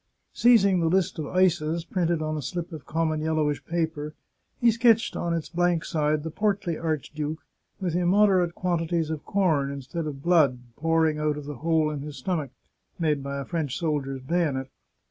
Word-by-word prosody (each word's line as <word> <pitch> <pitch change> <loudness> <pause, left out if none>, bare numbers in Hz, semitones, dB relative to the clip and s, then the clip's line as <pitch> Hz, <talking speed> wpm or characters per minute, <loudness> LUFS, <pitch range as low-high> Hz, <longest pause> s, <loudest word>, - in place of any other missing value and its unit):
Seizing 200 -6 +5
the 165 - +1
list 185 -2 +1
of 150 - -3
ices, 170 -2 +1
printed 170 -2 0
on 155 0 -2
a 150 - -3
slip 170 +5 -5
of 155 -3 -9
common 160 -1 0
yellowish 155 -2 0
paper, 160 -3 -2 0.4
he 235 -1 +5
sketched 230 0 +3
on 170 - -2
its 165 -2 -2
blank 175 -1 +1
side 150 -1 0
the 160 - -4
portly 200 -3 0
archduke, 155 -1 -3 0.3
with 180 -4 -2
immoderate 180 -1 +3
quantities 170 -2 -1
of 155 -2 -4
corn, 160 -8 +1
instead 140 +4 -5
of 140 -2 -6
blood, 160 -7 +4 0.2
pouring 160 -1 +1
out 150 -1 0
of 150 - -7
the 145 -2 -6
hole 160 +1 +1
in 150 - -4
his 145 -1 -7
stomach, 150 0 -2 0.5
made 155 -4 +1
by 140 0 -4
a 140 - -4
French 155 -5 -2
soldier's 140 -6 -2
bayonet. 140 -4 -1
160 Hz, 175 wpm, -26 LUFS, 150-175 Hz, 0.5 s, Seizing